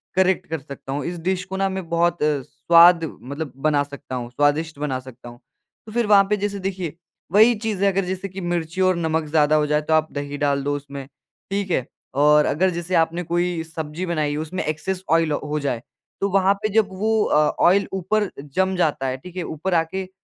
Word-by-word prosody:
Correct 190 0 +2
कर 160 -2 -2
सकता 135 -1 -9
हूँ। 145 - -3
इस 175 0 -4
डिश 185 +2 -1
को 190 0 -5
ना 195 0 +1
मैं 190 -3 -5
बहुत 170 -1 +1
अ, 150 -2 +1
स्वाद 170 +5 +5 0.2
मतलब 140 +2 -6
बना 145 +1 +1
सकता 140 -2 -8
हूँ, 120 -1 -4
स्वादिष्ट 145 +3 0
बना 135 -3 -2
सकता 125 -1 -12
हूँ। 120 0 -14 0.5
तो 215 - -10
फिर 235 0 +1
वहाँ 200 -1 +7
पे 210 - +2
जैसे 200 0 -3
देखिए, 185 -4 -3 0.4
वही 220 +4 +6
चीज़ 210 -2 -3
है 200 - +4
अगर 195 0 0
जैसे 190 +2 -4
कि 190 +1 -7
मिर्ची 175 +1 -2
और 185 -1 +4
नमक 160 -1 -1
ज़्यादा 150 0 +3
हो 150 -1 +2
जाए 150 0 +2
तो 160 +1 -1
आप 155 0 +3
दही 145 0 -4
डाल 140 -1 0
दो 145 0 0
उसमें। 140 -1 -7 0.5
ठीक 200 -2 -2
है? 130 - +1 0.3
और 150 +2 +5
अगर 185 +6 +2
जैसे 175 +1 -3
आपने 165 +2 +1
कोई 175 0 -1
सब्ज़ी 160 +2 -5
बनाई 155 -4 -1
हो 155 - -2
उसमें 170 +4 -4
एक्सेस 180 +5 -3
ऑयल 165 -2 +3
हो 150 +1 -2
जाए 130 -5 -2 0.4
तो 200 - +1
वहाँ 195 +1 +3
पे 215 - +1
जब 215 0 +3
वो 215 +3 +1
अ, - - +2 0.3
ऑयल 200 +3 +4
ऊपर 200 +2 0 0.3
जम 190 0 +2
जाता 150 -6 0
है, 130 0 -2
ठीक 180 +6 -12
है? 180 - -3
ऊपर 165 +4 -3
आके 165 +3 0
अ, 185 - -12
165 Hz, 220 wpm, -22 LUFS, 150-190 Hz, 0.5 s, वहाँ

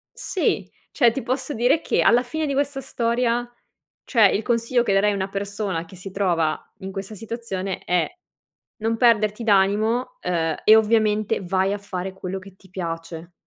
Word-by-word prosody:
Sì. 375 - -1 0.2
Cioè 235 -2 +4
ti 270 - -4
posso 260 +4 -2
dire 245 +7 +3
che - - 0
alla 240 +1 +5
fine 315 +4 -3
di 280 - -1
questa 280 0 -1
storia 240 -1 0 0.5
cioè, 230 -4 +2
il 210 - 0
consiglio 235 +2 +1
che 200 -4 +1
darei 205 +1 +3
a - - -2
una 190 -1 -2
persona 200 -3 -3
che 180 - -15
si 185 +2 -9
trova 170 -5 +1 0.2
in 190 -1 -7
questa 195 +2 -6
situazione 205 -3 -5
è: 180 0 +1 0.7
non 225 0 -1
perderti 220 -2 +3
d'animo 215 +5 +2
uhm, 165 -3 0
e 215 - +8
ovviamente 215 -2 +2
vai 190 +2 +1
a 205 - -2
fare 190 -2 -5
quello 190 0 -5
che 190 0 -13
ti 190 -1 -21
piace. 165 -1 -6
205 Hz, 175 wpm, -23 LUFS, 190-235 Hz, 0.7 s, e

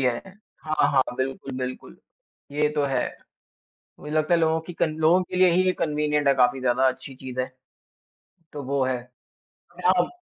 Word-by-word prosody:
किया 125 -2 +3
है? 190 +9 -10 0.3
हाँ, 155 0 +2
हाँ, 135 - +5
बिल्कुल, 135 +1 -3
बिल्कुल, 130 0 -6 0.6
ये 150 +1 +2
तो 145 - +1
है। 135 - 0 0.9
मुझे 150 +1 -7
लगता 155 +2 +2
है 170 - +3
लोगों 160 0 +2
की 175 - -6
कन 155 -3 0
लोगों 165 +4 +4
के 180 - -6
लिए 185 0 +6
ही 180 +2 +3
ये 185 - +4
कन्वीनिएंट 150 -1 0
है 140 - +5
काफ़ी 130 0 +3
ज़्यादा 130 +1 +3
अच्छी 130 +1 -5
चीज़ 130 -1 -5
है। 130 - -1 1.1
तो 145 - -6
वो 135 0 0
है। 130 0 0 0.6
अगर - - -5
आप 180 -1 +3
145 Hz, 190 wpm, -25 LUFS, 130-160 Hz, 1.1 s, लिए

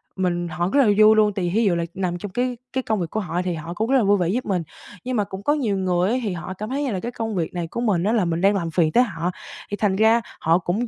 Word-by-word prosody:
mình 175 -2 -1
họ 175 +2 -2
rất 285 - +4
là 275 - +6
vui 215 0 +7
luôn, 210 -1 +3
tại 190 -2 -2
vì 175 - -1
thí 225 +5 +2
dụ 185 -4 +3
là 170 0 -1
nằm 180 -2 -2
trong 195 +2 -7
cái 245 +6 0
cái 250 -1 -4 0.2
cái 260 - 0
công 220 -3 -1
việc 170 -2 -3
của 220 - -2
họ 175 -3 -2
thì 180 -1 -2
họ 165 +2 -6
cũng 220 +6 -2
rất 270 - +5
là 250 - +3
vui 205 0 +4
vẻ 175 -3 0
giúp 245 +7 -1
mình. 185 -4 -1 0.4
Nhưng 255 0 -3
mà 210 - +2
cũng 195 0 -8
có 290 - +3
nhiều 235 -10 0
người 185 +1 +1
á, - - +1
thì 205 -4 -1
họ 175 +2 -6
cảm 210 +3 -6
thấy 280 +3 -1
như 270 - -1
là 190 - -2
cái 240 +5 -5
công 225 -3 -4
việc 170 -3 -2
này 175 -2 -3
của 235 - -4
mình 200 -8 +1
á, 210 - +1
là 215 -6 +2
mình 170 0 -1
đang 200 +2 +4
làm 170 -4 -2
phiền 160 -1 +2
tới 245 - +5
họ, 180 -6 -3 0.4
thì 205 - -2
thành 205 -3 +1
ra 220 +3 +4 0.2
họ 165 +1 +3
cũng 195 +7 -2
195 Hz, 335 wpm, -22 LUFS, 175-220 Hz, 0.4 s, vui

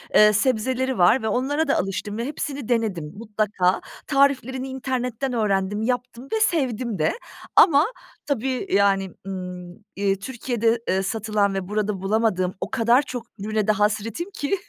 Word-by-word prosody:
eee, 210 0 +7
sebzeleri 255 +3 +1
var 185 +8 +5
ve - - 0
onlara 285 +7 0
da - - +2
alıştım 205 +2 -3
ve 235 - -2
hepsini 280 -2 -4
denedim, 205 -10 -1
mutlaka. 210 -4 0 0.3
Tariflerini 270 -2 +2
internetten 260 -1 -3
öğrendim, 205 -2 0
yaptım 250 +1 -3
ve 440 - +2
sevdim 255 - 0
de 155 - +2 0.4
ama 300 -3 +7 0.4
tabii, 260 -2 -1
yani, 195 -2 +3 0.2
ımm, 180 -2 -6 0.2
eee, 195 -1 +1
Türkiye'de, 235 0 -1
eee, 190 +1 +1
satılan 210 -1 0
ve 190 -1 -3
burada 210 -2 -1
bulamadığım 195 -3 +1
o - - -4
kadar 240 +1 +4
çok 245 -4 -7
ürüne 215 +1 -1
de - - +5
hasretim 210 - -1
ki 320 +4 -1
225 Hz, 145 wpm, -23 LUFS, 200-260 Hz, 0.4 s, eee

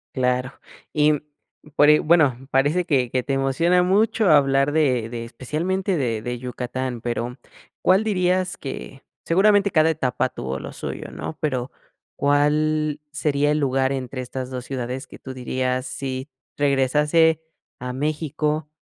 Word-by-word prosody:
Claro. 125 0 0 0.4
Y, 150 0 +4
mm, 150 - -1 0.6
pero, 150 -1 +7
y 150 - +5
bueno, 145 -6 +3
parece 145 +7 +2
que 135 -7 +1
que 130 -1 0
te 135 - -2
emociona 150 +7 +2
mucho 210 +2 +2
hablar 140 -1 +4
de 130 -7 +1
de 115 -1 -5
especialmente 175 +10 -2
de 115 -6 -1
de 120 +1 -4
Yucatán, 125 0 -4
pero, 120 +2 -3 0.4
¿cuál 190 +3 +4
dirías 185 -3 0
que?, 135 0 -8 0.2
seguramente 200 +3 +4
cada 155 0 +4
etapa 130 -5 0
tuvo 65 - -5
lo - - -7
suyo, - - -6
¿no?, 80 +2 -6
pero, 130 -4 -1 0.4
¿cuál 150 +1 +1
sería 145 0 +1
el 150 - +1
lugar 135 -1 +1
entre 130 -1 -4
estas 130 0 -5
2 130 -1 -6
ciudades?, 130 0 -4
que - - -13
tú 130 - -8
dirías: 130 0 -2
"Si 135 -3 -5 0.3
regresase 150 +4 +3 0.4
a 125 0 -4
México", 150 +1 -2
140 Hz, 145 wpm, -23 LUFS, 130-155 Hz, 0.6 s, pero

